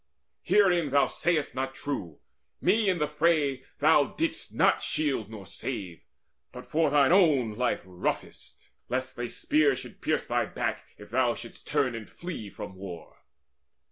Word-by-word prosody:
Herein 175 -7 +3
thou 140 +1 +4
sayest 170 -4 0
not 135 0 -3
true 100 - -5 0.4
Me 205 +2 +3
in 185 - +2
the 150 -2 0
fray 150 -3 +2 0.2
thou 150 -1 +5
didst 330 +2 -2
not - - +3
shield 140 -9 -1
nor 105 -3 -9
save, 95 - -6 0.4
But - - -9
for 160 +1 +2
thine 145 0 +4
own 150 - +4
life 125 +4 0
roughtest, 90 -1 -4 0.3
lest 130 +1 -2
a 120 -1 -2
spear 150 +1 +2
Should 130 - -9
pierce - - 0
thy - - 0
back - - -3
if 105 0 -13
thou 125 -1 +2
shouldst 115 - -11
turn 140 -4 +1
to 115 -2 -6
flee 170 - -7
From 95 - -8
war. 95 -4 -9
140 Hz, 155 wpm, -28 LUFS, 115-160 Hz, 0.4 s, thou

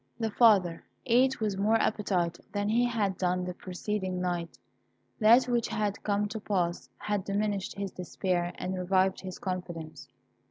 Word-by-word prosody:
The 225 -2 -1
father 200 -7 +4 0.2
ate 255 +2 +3
with 210 -3 -1
more 215 +3 +3
appetite 190 -6 0
than 205 0 -1
he 235 +3 +3
had 210 -6 -1
done 180 0 0
the 180 - -4
preceding 185 +1 -3
night. 175 -2 -3 0.6
That 235 +3 +6
which 240 -2 +1
had 210 -2 -2
come 205 0 0
to 220 - -4
pass 180 -5 -1
had 205 -2 -2
diminished 200 -1 -1
his 200 -1 -4
despair 180 -1 -2
and 185 +1 -3
revived 185 +1 +2
his 185 -1 -7
confidence. 175 -4 -5
195 Hz, 155 wpm, -29 LUFS, 180-215 Hz, 0.6 s, That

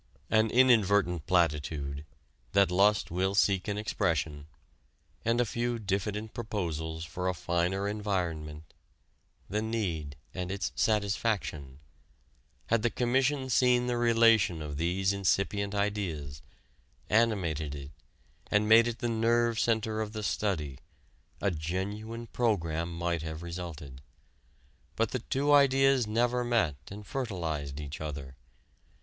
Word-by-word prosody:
An 110 0 +4
inadvertent 100 - +3
platitude 75 -5 0 0.5
that 100 -2 +4
lust 100 -1 +3
will 95 +3 0
seek 95 -1 +2
an 105 -1 -2
expression 80 -8 -1 0.8
and 115 +1 +1
a 120 - +3
few 120 +2 -2
diffident 105 +1 -3
proposals 80 -8 -3
for 90 +3 -4
a 90 - -2
finer 90 +4 0
environment 85 -7 -3 0.7
the 105 +1 -1
need 90 -11 -2 0.2
and 90 0 -4
its 100 0 -2
satisfaction: 100 - -1 0.9
had 115 -1 +1
the 120 - +2
Commission 130 +3 +1
seen 125 0 +3
the 125 0 0
relation 115 -7 +4
of 75 -2 -5
these 95 +4 +1
incipient 100 +1 0
ideas, 95 -9 -2 0.7
animated 90 -10 +1
it, 70 0 -8 0.6
and 105 +1 +2
made 115 +2 +7
it 115 -1 -3
the 120 - -2
nerve 115 0 +2
center 110 -1 0
of 110 0 -4
the 110 -1 -4
study, 80 -10 -2 0.6
a 100 - +1
genuine 100 +8 -4
program 85 -9 -1
might 85 -1 -2
have 80 +1 -6
resulted. 85 -6 -7 0.9
But 115 -1 0
the 130 - -1
two 140 +5 +1
ideas 135 -3 +5
never 120 +3 +1
met 110 - +1
and 105 +1 -9
fertilized 80 - -3
each 75 0 -7
other. 70 -4 -6
100 Hz, 125 wpm, -30 LUFS, 80-115 Hz, 0.9 s, made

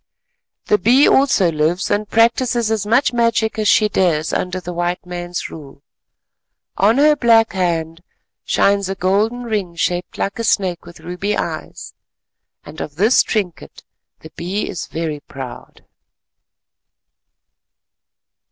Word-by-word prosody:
The 420 - +2
Bee 260 +5 +5
also 260 -10 +3
lives 160 +4 0
and 205 0 -1
practises 235 0 +2
as 210 -2 -1
much 240 +4 +2
magic 230 -2 +1
as 215 - 0
she 215 0 +4
dares 170 -6 0
under 185 0 -2
the 180 -1 -7
white 175 +1 -2
man's 175 0 -5
rule. 140 -2 -12 0.9
On 215 +5 +3
her 300 +1 +5
black 230 -4 +3
hand 165 -3 -2 0.4
shines 200 -1 +1
a 195 - -2
golden 210 +7 0
ring 205 -7 -3
shaped 175 +1 -2
like 200 - -3
a - - -1
snake 185 -6 0
with 170 -2 -13
ruby 180 +5 -3
eyes, 160 -2 -5 0.7
and 155 +2 -9
of 145 - -6
this 215 +9 +4
trinket 195 -6 -4 0.4
the 160 - -12
Bee 185 +6 -3
is 175 - -5
very 160 -2 -4
proud. 135 -3 -10
190 Hz, 135 wpm, -18 LUFS, 170-225 Hz, 0.9 s, Bee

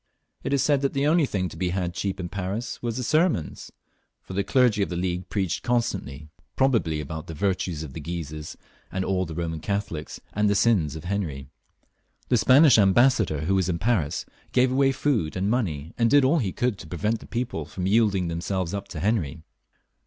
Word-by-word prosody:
It - - -2
is 140 -2 +2
said 145 -2 +2
that 140 - 0
the 140 +1 +1
only 155 -1 +3
thing 95 -5 -1
to - - -11
be 90 +2 -1
had 90 -1 -2
cheap 95 +1 -3
in 90 - -3
Paris 100 +5 -4
was 120 +1 -2
sermons, 155 - 0 0.5
for - - -9
the 100 +1 0
clergy 120 -1 +3
of 100 - 0
the 90 - -4
League 90 +1 -2
preached 95 -4 -1
constantly, 95 - -2 0.3
probably 115 - +2
about 75 +2 -6
the 80 - -7
virtues 90 -2 -1
of 70 -4 -8
the - - -6
Guises 75 -2 -6 0.3
and 95 0 -2
aU 95 -1 0
the 80 -2 -7
Eoman 80 -2 -3
Catholics, 100 -6 -3
and 105 0 +2
the 100 - +2
sins 100 -8 +2
of 80 - -7
Henry. 80 -9 -3 0.8
The 125 - +4
Spanish 130 +1 +6
Ambassador, 105 - +4
who 85 +5 0
was 95 -2 +1
in 85 - 0
Paris, 95 -7 0 0.3
gave 125 0 +4
away 135 +1 +3
food 125 - 0
and 95 +3 0
money, 85 - -2
and 115 -1 +4
did 145 0 +5
all 155 +5 +3
he 100 -8 -1
could 120 -2 -1
to - - -9
prevent 105 +7 -1
the - - -13
people 120 - -3
from 90 +4 -5
yielding 100 -3 +2
themselves 85 +2 -2
up 100 0 -4
to 80 -6 -6
Henry. 85 -7 -1
95 Hz, 200 wpm, -25 LUFS, 85-120 Hz, 0.8 s, Spanish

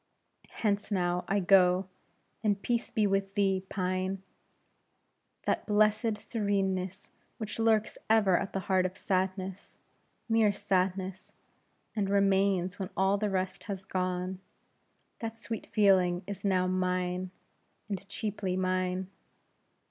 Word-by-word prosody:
Hence 205 -2 -1
now 180 -3 0
I 200 - +2
go; 185 0 +5 0.6
and 205 -2 +2
peace 235 +3 -1
be 215 -2 +1
with 195 0 0
thee, 195 -2 +2
pine! 185 0 -2 1.2
That - - 0
blessed 215 +1 +3
sereneness 195 -3 -2 0.3
which 215 0 -5
lurks 220 -1 +2
ever 210 -4 +5
at 195 - -1
the 195 - -2
heart 185 0 +2
of 185 +2 -12
sadness 190 0 -2 0.5
mere 225 -2 +4
sadness 190 -1 -1 0.6
and 200 -3 0
remains 195 -2 +2
when 190 -1 -3
all 195 +1 +3
the 210 0 0
rest 185 -1 -2
has 195 -2 -5
gone; 185 0 -2 0.8
that 225 0 -5
sweet 225 0 -5
feeling 185 -4 +3
is 200 0 -6
now 185 -2 +2
mine, 185 0 0 0.6
and 195 -1 -5
cheaply 200 -3 -2
mine. 185 0 0
195 Hz, 120 wpm, -30 LUFS, 185-205 Hz, 1.2 s, go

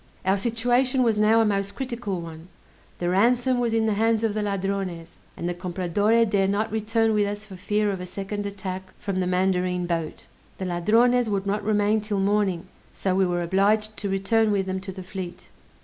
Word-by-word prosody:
Our 190 +1 +2
situation 245 +4 +1
was 225 -3 +2
now 220 +2 +5
a - - +3
most 200 -1 -1
critical 235 -8 -4
one; 165 0 -9 0.5
the 175 - -2
ransom 245 +6 +3
was 240 -2 +1
in 225 0 +2
the 220 - +2
hands 225 +1 +1
of 220 -2 +1
the 215 - -1
Ladrones, 195 -4 -3 0.2
and 170 - -3
the 175 - -1
Compradore 185 +5 +1
dare 200 -3 +1
not 205 +2 0
return 220 +1 +1
with 205 -1 +2
us 205 +1 -5
for 200 -2 -10
fear 205 +3 0
of 190 -2 -4
a 180 - -6
second 200 +2 -4
attack 190 -1 -6
from 195 -2 -3
the 180 - 0
mandarine 180 -1 +1
boat. 165 -2 -3 0.3
The 190 - -4
Ladrones 225 +7 +3
would 200 -1 -1
not 200 +1 -1
remain 210 0 +2
'till 205 -1 -2
morning, 195 -2 +1 0.3
so 190 - -1
we 190 0 +3
were 175 0 -1
obliged 210 +4 +2
to 200 - -3
return 210 +3 +2
with 195 -2 +1
them 190 0 -2
to 190 0 -6
the 185 0 -8
fleet. 180 -1 -7
200 Hz, 200 wpm, -25 LUFS, 185-220 Hz, 0.5 s, now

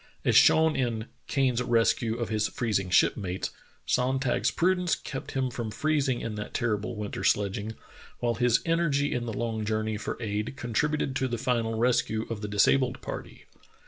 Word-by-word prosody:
As - - +3
shown 160 -1 +6
in 115 -4 -1 0.2
"Kane's 130 -3 +1
Res 115 -2 +3
cue 115 -1 -3
of 120 -3 -3
His 110 -1 +1
Freezing 105 -6 -1
Shipmates," 90 0 +1 0.3
Sonntag's 130 0 +1
prudence 180 0 +1
kept 135 -2 -7
him 130 -1 0
from 115 -2 -4
freezing 140 +1 0
in 115 - -4
that 105 0 -6
terrible 110 -3 -1
winter 105 -1 -5
sledging, 105 +2 0 0.4
while 120 -1 0
his 120 0 +2
energy 165 -4 +1
in 120 -1 -2
the - - -2
long 110 -1 -2
journey 110 0 -1
for - - -5
aid 105 +2 -3
contributed 135 +4 -1
to 130 - 0
the 120 -1 -2
final 115 -2 0
rescue 115 -2 +1
of 110 -3 -4
the 105 - -3
disabled 120 +5 +2
party. - - -7
120 Hz, 170 wpm, -28 LUFS, 110-130 Hz, 0.4 s, shown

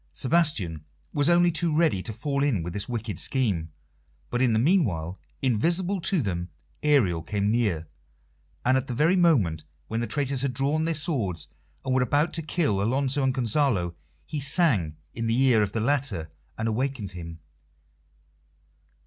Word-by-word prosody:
Sebastian 125 - 0 0.3
was 145 +1 +2
only 175 0 +4
too 160 -1 0
ready 160 - +2
to 110 - -5
fall 140 +6 -2
in 120 - +1
with 85 +1 -5
this 100 +5 -4
wicked 115 -3 -4
scheme, 100 -12 0 0.6
but 120 - 0
in 125 -2 +3
the 110 - +2
meanwhile, 105 - +1 0.2
invisible 170 - +1
to 170 -2 +1
them, 90 -3 -3 0.3
Ariel 120 - +3
came 100 +3 -1
near, 100 -9 0 0.8
and 130 +1 +4
at 130 +1 -2
the 125 - -4
very 160 +8 +3
moment 115 - +2 0.3
when 115 - -2
the 120 - -2
traitors 140 -2 -1
had 135 -3 -1
drawn 145 +4 +1
their 165 0 0
swords 100 - -1 0.4
and 130 - 0
were 130 - +3
about 145 +6 +1
to 165 - -1
kill 150 - 0
Alonso 135 +5 +1
and 135 -1 +2
Gonzalo 115 - +1 0.3
he 150 - -4
sang 140 - +3 0.2
in 115 0 -3
the 115 +2 +1
ear 130 -5 +4
of 100 -2 0
the 110 - -2
latter 115 - 0 0.3
and 110 - -2
awakened 115 -3 -2
him. 85 -2 -8
125 Hz, 165 wpm, -26 LUFS, 100-145 Hz, 0.8 s, only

